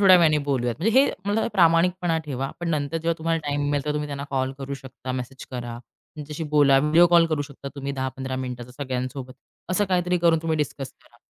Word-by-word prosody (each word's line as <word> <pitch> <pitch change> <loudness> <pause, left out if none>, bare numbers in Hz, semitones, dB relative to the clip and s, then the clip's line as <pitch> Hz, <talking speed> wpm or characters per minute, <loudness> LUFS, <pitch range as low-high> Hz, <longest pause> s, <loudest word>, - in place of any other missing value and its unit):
थोड्या 190 -2 +8
वेळाने 155 -3 +4
बोलूयात." 120 -4 0
म्हणजे 225 +8 +3
हे 280 - +3 0.2
मला 210 +2 +1
प्रामाणिकपणा 175 -1 +3
ठेवा. 135 -1 -3
पण 170 - -2
नंतर 150 +1 -1
जेव्हा 165 +1 0
तुम्हाला 165 0 0
टाईम 145 0 -1
मिळेल, 145 -1 0
तेव्हा 150 - 0
तुम्ही 150 0 -2
त्यांना 140 0 -4
कॉल 130 -1 0
करू 140 0 -4
शकता, 130 -1 -7
मेसेज 130 +1 -6
करा. 120 -2 -5 0.4
त्यांच्याशी 150 +1 -6
बोला 145 -2 +5
व्हिडिओ 155 +4 +5
कॉल 170 -1 +5
करू 155 -3 -1
शकता 140 -1 -9
तुम्ही 140 0 -4
10-15 130 0 -4
मिनिटाचा 125 -1 -5
सगळ्यांसोबत. 130 0 -4 0.4
असं 205 +3 +2
काहीतरी 180 -1 +1
करून 165 -1 +4
तुम्ही 160 -1 0
डिस्कस 140 -2 -3
करा 120 - -24
145 Hz, 200 wpm, -24 LUFS, 130-165 Hz, 0.4 s, थोड्या